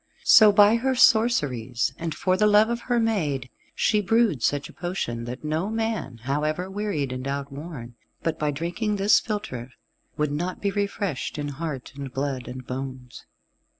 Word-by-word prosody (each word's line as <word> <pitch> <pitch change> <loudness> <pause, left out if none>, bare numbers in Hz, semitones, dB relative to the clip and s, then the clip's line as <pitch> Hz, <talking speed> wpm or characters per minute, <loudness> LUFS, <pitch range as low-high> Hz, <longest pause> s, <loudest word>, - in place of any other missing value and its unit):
So 215 -1 +8
by 205 +2 +6
her 260 +2 0
sorceries, 140 - +3
and 165 -2 -3
for 185 0 +1
the 210 +3 +3
love 210 +1 +5
of 235 0 -2
her 240 -1 +3
maid, 150 - -1 0.2
she 210 -1 +2
brewed 210 - +2
such 145 +4 0
a - - -15
potion 160 -10 -4
that 125 +4 -7
no 155 +6 -1
man, 220 - -3
however 155 +7 -1
wearied 195 -10 -2
and 130 +1 -4
outworn, 140 -2 -6 0.3
but 165 -1 -1
by 150 - 0
drinking 175 +9 -2
this 200 +1 +4
philtre, 170 - -5 0.5
would 150 -1 0
not 175 +5 -3
be 200 - 0
refreshed 200 - -2
in 145 -1 -3
heart 145 -2 -5
and 140 -2 -6
blood 135 -2 -3
and 130 0 -7
bones. 130 -1 -7
155 Hz, 165 wpm, -25 LUFS, 135-205 Hz, 0.5 s, So